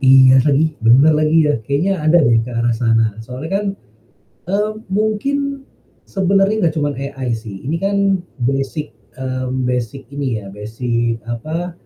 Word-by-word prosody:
Iya 130 -1 +7
lagi, 150 +2 +3
benar 125 +7 +6
lagi 155 +1 +3
ya, 150 0 +2
kayaknya 155 - 0
ada 155 +3 +4
deh 115 -4 +4
ke 115 - -6
arah 120 0 0
sana, 115 -2 +1
soalnya 125 +7 -7
kan, 210 - -5 0.9
eee, 210 +2 +1 0.2
mungkin, 270 +7 -1 0.4
sebenarnya 195 +1 +1
nggak 160 - 0
cuman 145 -1 0
AI 135 -2 -4
sih, 110 -4 -9
ini 150 +5 -2
kan 195 0 +1 0.2
basic, 135 +4 -1 0.3
mmm, 130 0 -3
basic 125 +1 -2
ini 130 -6 -2
ya 100 - -10
basic 115 +3 -2
apa, 155 +9 -4
135 Hz, 145 wpm, -18 LUFS, 120-170 Hz, 0.9 s, Iya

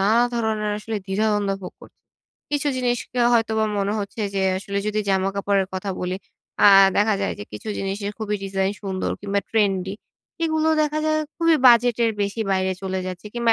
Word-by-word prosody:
নানা 220 +5 +4
ধরনের 220 -2 -1
আসলে 220 +1 -4
দ্বিধাদ্বন্দ্ব 205 0 +1
ভোগ - - -7
করি। - - -15 0.6
কিছু 290 0 0
জিনিসকে 245 0 -1
হয়তোবা 220 -1 +2
মনে 200 +1 0
হচ্ছে 205 +2 -6
যে, 195 - 0 0.2
আসলে 200 +1 -4
যদি 215 0 0
জামাকাপড়ের 195 0 +1
কথা 190 +1 -3
বলি 180 +1 -2 0.5
আ - - +10 0.3
দেখা 210 +1 +3
যায় 195 - 0
যে, 105 - -6
কিছু 105 - -8
জিনিসের 200 +1 -3
খুবই 210 -1 -2
ডিজাইন 195 0 -1
সুন্দর 190 -1 -2
কিংবা 200 0 -1
ট্রেন্ডি। 195 -3 +1 0.5
এগুলো 315 -1 +1
দেখা 300 0 -1
যায় 310 0 +2 0.2
খুবই 330 -1 +4
বাজেটের 235 -1 +5
বেশি 200 +3 -3
বাইরে 190 0 +1
চলে 190 0 -2
যাচ্ছে 185 +3 -7
কিংবা 235 -1 +3
205 Hz, 170 wpm, -23 LUFS, 195-230 Hz, 0.6 s, আ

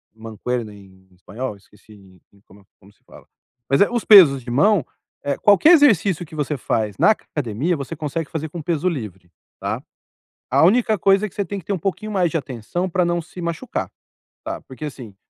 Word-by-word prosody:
mancuerna 115 0 -5
em 95 -2 -18
espanhol, 105 +5 -7
esqueci 100 -2 -20 0.2
como 100 +2 -19
é - - -24 0.2
como 100 +2 -20
se - - -36
fala. - - -17 0.4
Mas, 135 - +3
eh, 200 - +5
os 240 -2 -2
pesos 160 -11 +8
de 120 - -8
mão, 175 - +3 0.4
eh, 140 -1 -2
qualquer 210 - +5
exercício 200 - +3
que 155 - -13
você 150 0 -2
faz 110 -5 -2
na - - +4
c 220 - 0 0.2
academia, 145 +5 -1
você 140 +4 -6
consegue 155 +1 -4
fazer 160 -1 -4
com 170 +1 -7
peso 165 +2 -1
livre, 95 - -7 0.3
tá. - - -3 0.7
A 140 +5 +4
única 220 +4 +3
coisa 195 +3 +3
é - - -7
que - - -22
você 200 - -2
tem 200 +2 -5
que 185 - -10
ter - - -2
um - - -3
pouquinho 205 +5 -4
mais 180 -4 +1
de - - -2
atenção 140 - -4
para 180 +1 +1
não 175 0 0
se 175 +2 -11
machucar, 170 -1 -4 0.5
tá. - - -5
Porque 130 +3 -10
assim, 125 -8 -9
150 Hz, 205 wpm, -21 LUFS, 110-185 Hz, 0.7 s, pesos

